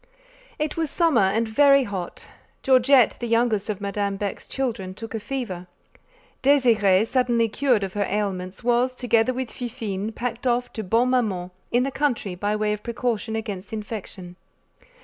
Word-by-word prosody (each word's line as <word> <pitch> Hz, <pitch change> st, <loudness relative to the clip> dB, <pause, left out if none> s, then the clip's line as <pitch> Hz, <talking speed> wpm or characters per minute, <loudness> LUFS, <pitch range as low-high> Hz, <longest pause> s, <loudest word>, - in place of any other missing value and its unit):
It 300 Hz, 0 st, -2 dB
was 325 Hz, -2 st, 0 dB
summer 325 Hz, -, +3 dB
and 210 Hz, +4 st, +2 dB
very 275 Hz, +4 st, +5 dB
hot. 195 Hz, -6 st, -6 dB, 0.4 s
Georgette, 260 Hz, -2 st, +5 dB
the 240 Hz, -, -3 dB
youngest 230 Hz, -3 st, +1 dB
of 205 Hz, -2 st, -2 dB
Madame 200 Hz, 0 st, -2 dB
Beck's 200 Hz, 0 st, -5 dB
children, 225 Hz, -8 st, -3 dB
took 225 Hz, +2 st, -7 dB
a 225 Hz, -, -2 dB
fever. 210 Hz, -7 st, -5 dB, 0.7 s
Désirée, 225 Hz, -8 st, +4 dB
suddenly 240 Hz, -1 st, +2 dB
cured 240 Hz, -1 st, +1 dB
of 190 Hz, -1 st, -4 dB
her 205 Hz, -1 st, -1 dB
ailments, 190 Hz, -1 st, -3 dB
was, 245 Hz, +2 st, +2 dB
together 240 Hz, -1 st, +2 dB
with 255 Hz, -2 st, -4 dB
Fifine, 225 Hz, -4 st, -4 dB
packed 240 Hz, +2 st, -4 dB
off 245 Hz, 0 st, 0 dB
to 220 Hz, -, -4 dB
Bonne 230 Hz, +6 st, +2 dB
Maman, 195 Hz, -8 st, 0 dB, 0.2 s
in 245 Hz, +1 st, +3 dB
the 275 Hz, -, -2 dB
country, 250 Hz, -9 st, -1 dB
by 205 Hz, +4 st, -1 dB
way 210 Hz, 0 st, 0 dB
of 210 Hz, -, -5 dB
precaution 235 Hz, -2 st, -2 dB
against 205 Hz, -4 st, -5 dB
infection. 205 Hz, -5 st, -7 dB
225 Hz, 160 wpm, -24 LUFS, 200-250 Hz, 0.7 s, very